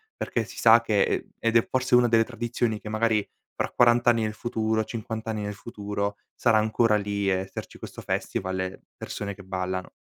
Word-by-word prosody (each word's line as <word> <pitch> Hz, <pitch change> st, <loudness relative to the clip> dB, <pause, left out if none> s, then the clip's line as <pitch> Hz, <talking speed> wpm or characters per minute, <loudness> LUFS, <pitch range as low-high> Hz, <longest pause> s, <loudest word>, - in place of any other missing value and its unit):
perché -, -, -2 dB
si -, -, -12 dB
sa -, -, +7 dB
che, -, -, +1 dB
ehm, 405 Hz, -5 st, -1 dB
ed 115 Hz, 0 st, +3 dB
è 115 Hz, -, +2 dB
forse 130 Hz, -1 st, +2 dB
una 125 Hz, 0 st, +5 dB
delle 115 Hz, -1 st, +4 dB
tradizioni 115 Hz, -2 st, -2 dB
che 105 Hz, -, -11 dB
magari 110 Hz, -1 st, +1 dB, 0.3 s
fra -, -, -1 dB
quarant'anni 120 Hz, -1 st, +4 dB
nel 110 Hz, 0 st, -1 dB
futuro, 110 Hz, -2 st, -1 dB
cinquant'anni 110 Hz, -1 st, -4 dB
nel 105 Hz, 0 st, -3 dB
futuro, 100 Hz, -1 st, -4 dB, 0.2 s
sarà 115 Hz, -3 st, +3 dB
ancora 110 Hz, 0 st, +2 dB
lì 100 Hz, -1 st, -1 dB
e 95 Hz, -, +3 dB
esserci 95 Hz, +1 st, -7 dB
questo -, -, -8 dB
festival 95 Hz, 0 st, -2 dB
e 95 Hz, -, -1 dB
le -, -, -14 dB, 0.2 s
persone 100 Hz, 0 st, -5 dB
che 100 Hz, -, -12 dB
ballano. 95 Hz, 0 st, -3 dB
110 Hz, 190 wpm, -26 LUFS, 100-115 Hz, 0.3 s, sa